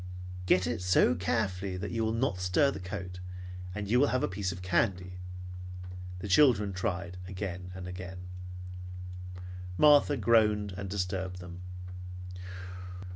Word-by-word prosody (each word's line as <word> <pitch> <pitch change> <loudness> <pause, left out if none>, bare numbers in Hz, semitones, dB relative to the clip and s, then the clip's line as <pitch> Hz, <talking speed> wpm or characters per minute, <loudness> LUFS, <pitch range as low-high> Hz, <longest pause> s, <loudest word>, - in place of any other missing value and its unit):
"Get 90 -1 +5
it 80 - -1
so 90 -1 +5
carefully 95 +1 0
that 95 +3 -3
you 115 -1 +1
will 110 - +2
not 115 -4 +1
stir 90 +10 +4
the - - -5
coat, 90 -1 -5 0.6
and 100 -1 -2
you 120 +5 +5
will 145 - +6
have 130 0 +2
a - - +3
piece 95 0 -1
of 90 0 -7
candy." 90 +1 +1 1.0
The 90 - -5
children 105 -3 +6
tried 90 0 -2
again 90 -1 -4
and 95 -1 -5
again. 90 0 -6 1.5
Martha 145 -1 +7
groaned 105 -4 +4
and 95 +1 -5
disturbed 95 -1 -1
them. 90 0 -8
95 Hz, 135 wpm, -31 LUFS, 90-105 Hz, 1.5 s, Martha